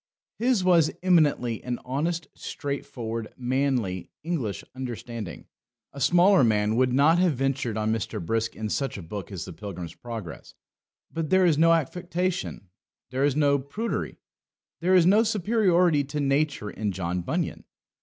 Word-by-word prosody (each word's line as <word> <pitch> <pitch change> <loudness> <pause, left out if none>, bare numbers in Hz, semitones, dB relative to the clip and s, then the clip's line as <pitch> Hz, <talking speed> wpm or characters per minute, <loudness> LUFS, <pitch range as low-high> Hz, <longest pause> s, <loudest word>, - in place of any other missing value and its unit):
His 240 -4 +2
was 170 -4 +5
eminently 150 - +2
an 125 -1 -2
honest, 165 +6 -1
straightforward, 115 -5 -5
manly, 125 -7 -1
English 150 - -2
understanding. 115 - -6 0.5
A 140 - -8
smaller 180 +4 +5
man 105 -1 +2
would 125 +1 +3
not 150 +6 +4
have 180 -3 +3
ventured 130 -4 -1
on 110 0 +1
Mr. 110 0 -3
Brisk 115 +6 -1
in 110 -1 -4
such 135 +1 -2
a 95 - -7
book 95 +4 -7
as 90 -4 -5
the - - -8
Pilgrim's 90 -5 -7
Progress. 115 -8 -8 0.6
But 160 -2 -2
there 190 0 +5
is 155 -4 +3
no 165 +1 +6
affectation, 175 - -2 0.4
there 130 +1 0
is 145 -2 +2
no 145 -2 +3
prudery, 200 - -4 0.6
there 185 +2 +3
is 180 -2 +6
no 200 +5 +6
superiority 185 -7 +3
to 150 +2 -4
nature 140 -5 0
in 105 -2 -2
John 90 -1 -2
Bunyan. - - -2
135 Hz, 150 wpm, -26 LUFS, 110-170 Hz, 0.6 s, no